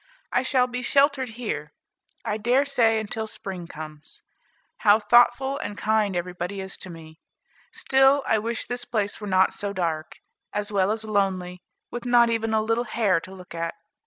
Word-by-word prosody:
I - - +2
shall 255 -1 +2
be 250 0 -4
sheltered 275 0 +2
here, 150 -11 -4 0.5
I 210 - -1
dare 245 +6 +2
say, 230 -5 +3
until 220 +1 -4
spring 190 -5 -7
comes. 155 -1 -10 0.5
How 205 0 +5
thoughtful 240 +5 +4
and 205 -8 -5
kind 215 -2 +1
everybody 180 +2 -4
is 190 0 -6
to 185 - -6
me! 160 -1 -12 0.5
Still 270 +1 +3
I 220 - +2
wish 230 +2 -3
this 245 0 -4
place 210 -2 -2
were 210 - -5
not 190 -1 +3
so 200 -1 -4
dark, 165 -4 -3 0.4
as 205 0 -2
well 195 0 +2
as 220 0 -1
lonely, 190 -4 -1 0.3
with 240 0 -6
not 240 -1 +5
even 225 -1 0
a 220 -1 +2
little 225 +2 0
hare 210 -6 +1
to 185 - -11
look 185 -2 -11
at. 165 0 -3
215 Hz, 175 wpm, -25 LUFS, 185-240 Hz, 0.5 s, How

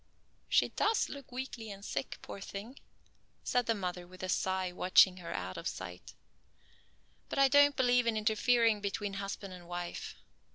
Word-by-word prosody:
"She - - +4
does 435 +1 +1
look 280 -3 -9
weakly 245 -3 -5
and 200 0 -8
sick, 135 -1 -3
poor 200 - -8
thing," 215 +8 -8 0.6
said 245 -1 +1
the 230 - +2
mother 180 -3 -4
with 185 +1 -12
a 185 - -3
sigh 185 0 0
watching 185 +1 +5
her 170 -2 -7
out 90 0 -4
of - - -4
sight, 90 0 -7 1.1
"but - - -4
I 275 0 +6
don't 285 +1 +6
believe 245 -2 +3
in 225 -1 +2
interfering 220 0 +3
between 200 0 -3
husband 195 -1 -5
and 175 -1 -11
wife. 175 0 -5
200 Hz, 165 wpm, -32 LUFS, 185-245 Hz, 1.1 s, I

